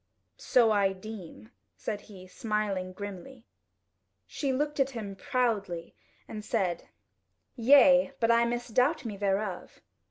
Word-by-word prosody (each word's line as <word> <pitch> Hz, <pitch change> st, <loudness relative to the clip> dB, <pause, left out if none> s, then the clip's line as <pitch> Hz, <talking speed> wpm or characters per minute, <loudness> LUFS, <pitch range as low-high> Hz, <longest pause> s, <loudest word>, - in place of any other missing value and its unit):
"So 235 Hz, -3 st, +3 dB
I 200 Hz, -2 st, +2 dB
deem," 185 Hz, -, -10 dB, 0.3 s
said 210 Hz, -2 st, -4 dB
he, 190 Hz, -4 st, -13 dB
smiling 200 Hz, -2 st, -2 dB
grimly. 205 Hz, +6 st, -9 dB, 0.8 s
She 275 Hz, -3 st, -2 dB
looked 295 Hz, +3 st, -1 dB
at 270 Hz, 0 st, +3 dB
him 215 Hz, -6 st, -6 dB
proudly 200 Hz, -8 st, -2 dB, 0.3 s
and 215 Hz, -1 st, -7 dB
said: 190 Hz, -6 st, -1 dB, 0.7 s
"Yea, 270 Hz, +2 st, +6 dB
but 230 Hz, 0 st, +3 dB
I 235 Hz, 0 st, +4 dB
misdoubt 245 Hz, +4 st, 0 dB
me 215 Hz, -3 st, -4 dB
thereof." 195 Hz, -1 st, -2 dB
215 Hz, 120 wpm, -29 LUFS, 195-250 Hz, 0.8 s, Yea